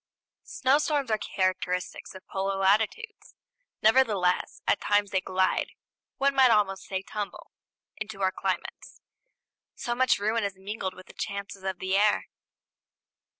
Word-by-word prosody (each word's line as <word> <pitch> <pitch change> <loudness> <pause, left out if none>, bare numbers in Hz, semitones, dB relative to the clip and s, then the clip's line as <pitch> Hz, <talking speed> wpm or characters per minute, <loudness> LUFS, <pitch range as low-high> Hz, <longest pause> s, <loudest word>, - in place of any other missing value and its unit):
Snowstorms 280 -1 +1
are 215 - +2
characteristic 185 -2 -1
of 190 - -11
polar 195 0 -2
latitudes; 220 - 0 0.5
nevertheless, 215 -6 +3
at - - +2
times 205 -1 +2
they 190 - +1
glide 185 0 0 0.4
one 275 0 +2
might 265 -2 +6
almost 200 -4 +2
say 190 0 -3
tumble 205 0 -6 0.5
into 210 -2 -5
our 190 - +3
climates; - - -4 0.8
so 240 - -2
much 260 +1 +3
ruin 220 +2 0
is 200 -1 -2
mingled 190 -1 -4
with 185 - -12
the - - -15
chances 200 -1 -5
of 190 -1 -3
the 190 +1 -1
air. 210 +1 +3
200 Hz, 135 wpm, -27 LUFS, 190-225 Hz, 0.8 s, might